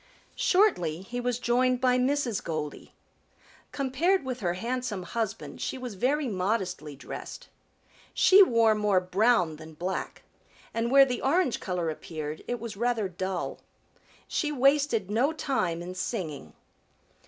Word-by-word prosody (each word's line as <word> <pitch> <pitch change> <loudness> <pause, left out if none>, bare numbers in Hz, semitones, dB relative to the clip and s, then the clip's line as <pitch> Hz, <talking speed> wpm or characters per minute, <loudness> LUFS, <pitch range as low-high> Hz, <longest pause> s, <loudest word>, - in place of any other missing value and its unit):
Shortly 185 - +2
he 245 +5 -5
was 245 -1 -1
joined 250 +1 +2
by 250 0 +3
Mrs. 255 -4 0
Goldy. 155 -3 -5 0.8
Compared 280 +6 +1
with 255 -1 -4
her 175 -3 -1
handsome 235 -1 -3
husband 190 -7 -4
she - - -3
was 250 -3 -6
very 270 +8 0
modestly 185 -7 -2
dressed. 135 - -8 0.6
She 385 +2 +6
wore 230 - +5
more 210 -3 +2
brown 180 -3 +2
than 155 0 -12
black, 180 +4 -4 0.5
and 230 +1 0
where 275 +1 +7
the 250 -2 -3
orange 300 -1 +2
color 180 -4 -2
appeared 155 -1 -6
it 245 0 -2
was 230 -2 -6
rather 230 -1 0
dull. 185 0 -4 0.7
She 300 -2 -1
wasted 275 -7 +2
no 255 +8 +2
time 185 - -1
in 180 +1 -6
singing. 170 - -4
225 Hz, 135 wpm, -28 LUFS, 180-255 Hz, 0.8 s, where